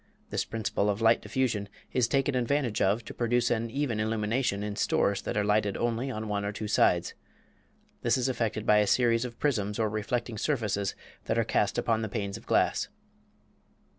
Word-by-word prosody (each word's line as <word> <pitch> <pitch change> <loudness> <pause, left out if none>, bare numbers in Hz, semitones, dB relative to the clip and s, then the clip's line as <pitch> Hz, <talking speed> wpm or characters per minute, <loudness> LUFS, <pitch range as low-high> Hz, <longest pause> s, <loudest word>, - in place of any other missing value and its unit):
This - - -1
principle 110 -2 -1
of 100 0 0
light 115 0 +4
diffusion 115 -6 -1 0.2
is 125 -3 +3
taken 135 +2 +1
advantage 125 -2 0
of 105 +4 +2
to - - -7
produce 120 0 +1
an 115 0 0
even 125 -3 -1
illumination 110 0 0
in 105 -1 -3
stores 100 -1 +1
that 120 - -3
are 105 - +2
lighted 105 -1 +1
only 120 +3 -1
on 110 -3 -4
one 100 -1 -1
or 100 - -2
two 105 +1 -5
sides. 105 - +2 0.9
This - - +2
is 130 0 0
effected 115 -4 -1
by 105 - +5
a 105 - +2
series 115 0 +3
of 120 -2 -7
prisms 105 -8 0
or 110 -2 0
reflecting 110 +1 -2
surfaces 105 -9 -1 0.3
that - - 0
are - - +3
cast - - 0
upon 115 -1 +1
the 110 - -3
panes 100 -2 -3
of - - -11
glass. - - +2
110 Hz, 190 wpm, -29 LUFS, 105-120 Hz, 0.9 s, by